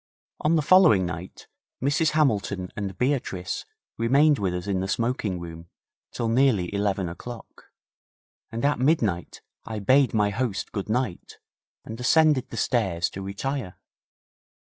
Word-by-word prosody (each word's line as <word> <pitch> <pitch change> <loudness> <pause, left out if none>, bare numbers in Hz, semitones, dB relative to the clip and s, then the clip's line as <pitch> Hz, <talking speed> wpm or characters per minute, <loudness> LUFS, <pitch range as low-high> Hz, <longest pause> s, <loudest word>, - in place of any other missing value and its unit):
On 155 +2 +2
the 155 - +2
following 165 - +6
night 85 +1 -7 0.3
Mrs 145 +4 +1
Hamilton 100 - 0
and 100 -2 -5
Beatrice 125 -9 -2 0.3
remained 140 +5 +4
with 95 -3 0
us 90 0 -4
in 100 -2 -1
the 95 - -2
smoking 110 -4 -1
room 85 0 -9 0.4
till 115 - -2
nearly 115 -7 +2
eleven 100 -2 0
o'clock, 115 +8 -9 0.9
and 115 +3 -2
at 145 -2 +1
midnight 115 - 0 0.2
I 110 - -6
bade 130 +5 +3
my 105 -1 +2
host 105 -2 -2
good 100 0 -4
night, 110 -5 -2 0.5
and 110 +2 -7
ascended 145 +1 +3
the 115 - -7
stairs 95 -9 0
to 95 - -7
retire. 100 +2 -4
110 Hz, 140 wpm, -25 LUFS, 95-135 Hz, 0.9 s, following